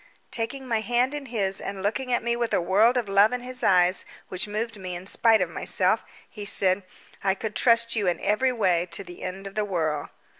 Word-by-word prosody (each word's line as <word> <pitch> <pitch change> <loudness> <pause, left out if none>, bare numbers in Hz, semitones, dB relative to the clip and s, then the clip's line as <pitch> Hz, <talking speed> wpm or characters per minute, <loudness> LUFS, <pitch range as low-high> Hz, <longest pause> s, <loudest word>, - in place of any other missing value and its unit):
Taking 260 +3 -3
my 225 -3 0
hand 245 +4 +1
in 290 -2 -5
his 195 -5 -2
and 195 -1 -5
looking 250 +5 -1
at 240 - +1
me 235 0 0
with 235 -1 0
a - - +3
world 210 +8 +3
of 240 -4 -1
love 200 +3 +5
in 250 - -2
his 255 0 -8
eyes, 180 -1 +4 0.3
which 185 +2 -2
moved 220 +2 -3
me 185 -1 -5
in 175 +1 -8
spite 225 +1 +4
of 180 - 0
myself, - - 0 0.2
he 210 - -9
said: 195 -1 +1 0.4
"I 190 -1 +2
could 215 +1 -4
trust 230 -1 +3
you 205 -4 0
in 175 - +1
every 215 +6 +1
way 180 -7 +1
to - - -2
the 175 -1 -12
end 190 +1 -6
of 195 - -7
the 215 - 0
world." 160 -7 -2
210 Hz, 225 wpm, -26 LUFS, 190-235 Hz, 0.4 s, love